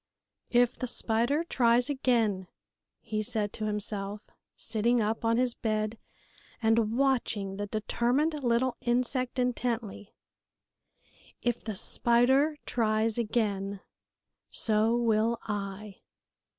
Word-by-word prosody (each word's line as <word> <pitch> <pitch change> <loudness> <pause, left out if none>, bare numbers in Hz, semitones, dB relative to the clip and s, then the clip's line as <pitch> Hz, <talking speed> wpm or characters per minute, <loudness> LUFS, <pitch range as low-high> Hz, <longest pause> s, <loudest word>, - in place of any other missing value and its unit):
"If 245 0 +2
the 255 - -2
spider 240 +7 +1
tries 245 -6 +3
again," 230 -9 +1 0.5
he 215 -2 -3
said 210 -1 -2
to 215 - -4
himself, 210 -1 -2 0.3
sitting 235 +2 +1
up 220 +1 -1
on 230 0 +2
his 250 -1 +2
bed 215 0 -2 0.6
and 225 0 +2
watching 230 -8 0
the 205 0 -3
determined 250 +8 0
little 240 +1 +1
insect 250 +2 0
intently, 235 -4 -2 1.3
"if 240 -1 -1
the 215 -3 -4
spider 265 +9 +3
tries 220 -1 +1
again, 200 -4 -1 0.7
so 220 +1 +1
will 230 0 +2
I!" 205 -1 -5
230 Hz, 105 wpm, -29 LUFS, 215-245 Hz, 1.3 s, tries